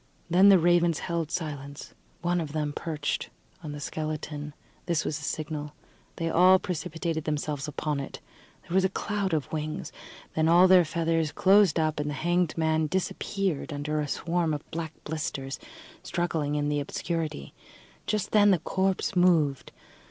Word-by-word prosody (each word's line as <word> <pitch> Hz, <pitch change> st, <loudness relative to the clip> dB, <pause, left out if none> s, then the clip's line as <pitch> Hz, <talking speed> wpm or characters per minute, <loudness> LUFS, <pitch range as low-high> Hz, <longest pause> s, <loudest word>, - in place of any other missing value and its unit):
Then 190 Hz, +3 st, +7 dB
the 195 Hz, -, +8 dB
ravens 175 Hz, -1 st, +3 dB
held 170 Hz, -2 st, -2 dB
silence. 145 Hz, -4 st, -5 dB, 0.3 s
One 175 Hz, 0 st, +1 dB
of 150 Hz, -2 st, -5 dB
them 150 Hz, -2 st, -1 dB
perched 155 Hz, -2 st, -3 dB, 0.3 s
on 155 Hz, -3 st, -6 dB
the 145 Hz, -, -6 dB
skeleton. 150 Hz, -1 st, -4 dB, 0.3 s
This 170 Hz, -3 st, +1 dB
was 155 Hz, -, -2 dB
a -, -, -10 dB
signal: 150 Hz, 0 st, -4 dB, 0.4 s
they 165 Hz, -, -2 dB
all 180 Hz, +3 st, +6 dB
precipitated 165 Hz, -3 st, -3 dB
themselves 150 Hz, -1 st, -2 dB
upon 150 Hz, 0 st, -2 dB
it. 140 Hz, -, -6 dB, 0.4 s
There -, -, -8 dB
was 190 Hz, 0 st, +4 dB
a 190 Hz, -, +3 dB
cloud 200 Hz, -1 st, -2 dB
of 155 Hz, -4 st, -1 dB
wings, 155 Hz, 0 st, -3 dB, 0.4 s
then 160 Hz, 0 st, +2 dB
all 175 Hz, +3 st, +7 dB
their 185 Hz, -2 st, +7 dB
feathers 165 Hz, -1 st, 0 dB
closed 195 Hz, -3 st, +4 dB
up, 155 Hz, -1 st, 0 dB
and 150 Hz, 0 st, -1 dB
the 145 Hz, -, -3 dB
hanged 175 Hz, +2 st, 0 dB
man 160 Hz, -1 st, +2 dB
disappeared 185 Hz, -1 st, -2 dB
under 150 Hz, +1 st, -2 dB
a 145 Hz, -, -2 dB
swarm 165 Hz, +1 st, 0 dB
of 145 Hz, -, -8 dB
black 165 Hz, -1 st, -4 dB
blisters 140 Hz, -3 st, -4 dB, 0.4 s
struggling 165 Hz, -4 st, -1 dB
in 145 Hz, 0 st, 0 dB
the 145 Hz, 0 st, 0 dB
obscurity. 155 Hz, -, -3 dB, 0.5 s
Just 210 Hz, -2 st, -1 dB
then 205 Hz, -1 st, +6 dB
the 190 Hz, -, +5 dB
corpse 190 Hz, +4 st, -1 dB
moved. 160 Hz, -7 st, +3 dB
160 Hz, 160 wpm, -27 LUFS, 150-175 Hz, 0.5 s, the